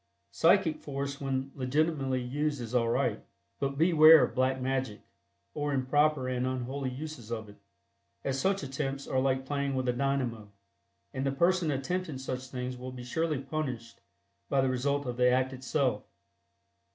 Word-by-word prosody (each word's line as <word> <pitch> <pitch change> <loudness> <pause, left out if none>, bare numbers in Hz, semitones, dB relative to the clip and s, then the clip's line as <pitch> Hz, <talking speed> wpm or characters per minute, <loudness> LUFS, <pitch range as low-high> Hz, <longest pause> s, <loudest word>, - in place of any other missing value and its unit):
Psychic 175 -6 +3
force 140 -1 -4
when 135 0 -2
legitimately 135 0 0
used 145 +3 -1
is 120 -1 -6
all 115 -2 +2
right, - - 0 0.4
but 140 0 -2
beware 160 -2 +8
of 125 - -1
"black 130 +1 +1
magic" 130 -4 -2 0.5
or 145 -1 -2
improper 135 +1 +2
and 125 0 -1
unholy 130 +1 -3
uses 130 -3 -7
of 110 -2 -4
it, 105 - -14 0.7
as 135 0 -1
such 195 +3 +1
attempts 135 0 -3
are 130 - +1
like 130 0 +1
playing 140 -1 -1
with 130 -1 -1
a 125 - +2
dynamo, 120 -5 -1 0.6
and 135 -1 -2
the 135 - +1
person 170 +3 +2
attempting 150 +3 -2
such 130 0 -5
things 125 0 -5
will 130 +1 -7
be 125 -1 -8
surely 155 +3 -1
punished 130 -5 -5 0.5
by 140 - +2
the 135 0 +3
result 140 +3 0
of 120 -1 -4
the 125 0 +5
act 130 +1 +1
itself. 130 -3 0
135 Hz, 165 wpm, -30 LUFS, 125-145 Hz, 0.7 s, beware